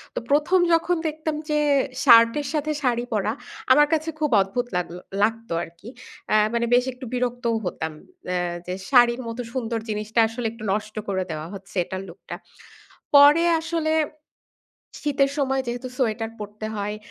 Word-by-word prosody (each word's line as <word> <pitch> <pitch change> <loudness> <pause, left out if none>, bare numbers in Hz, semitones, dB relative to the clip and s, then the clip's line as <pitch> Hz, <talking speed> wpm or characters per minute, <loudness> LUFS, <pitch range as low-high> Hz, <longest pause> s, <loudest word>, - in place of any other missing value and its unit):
তো - - 0
১ম 305 +6 +4
যখন 335 +2 +2
দেখতাম 310 0 -3
যে 300 - +2 0.4
শার্টের 235 +3 +6
সাথে 305 0 -1
শাড়ি 240 -2 +1
পরা 210 0 0 0.4
আমার 295 +2 +7
কাছে 315 0 0
খুব 300 -2 +1
অদ্ভুত 240 +6 -2
লাগলো 180 0 -4 0.2
লাগত 225 +1 0
আরকি। 170 +7 -11 0.4
আ - - +5 0.2
মানে 235 0 +1
বেশ 245 0 +5
একটু 255 +1 -10
বিরক্তও 245 -1 -1
হতাম। 160 -2 -3 0.4
এ - - 0 0.3
যে 180 - -2 0.2
শাড়ির 245 -1 +5
মতো 230 +2 -4
সুন্দর 230 -3 -2
জিনিসটা 215 +2 -1
আসলে 230 +2 -6
একটু 230 -1 -12
নষ্ট 215 +1 -4
করে 190 -2 -1
দেওয়া 155 +1 -5
হচ্ছে 195 +2 -11
এটার 190 +2 -6
লুকটা। 175 +3 -9 0.8
পরে 290 +3 +8 0.2
আসলে 325 -1 -1 1.1
শীতের 275 -2 +2
সময় 270 -1 +1
যেহেতু 245 +2 -4
সোয়েটার 225 -3 0
পড়তে 210 +1 -6
হয় 210 +1 -3
240 Hz, 155 wpm, -24 LUFS, 215-285 Hz, 1.1 s, পরে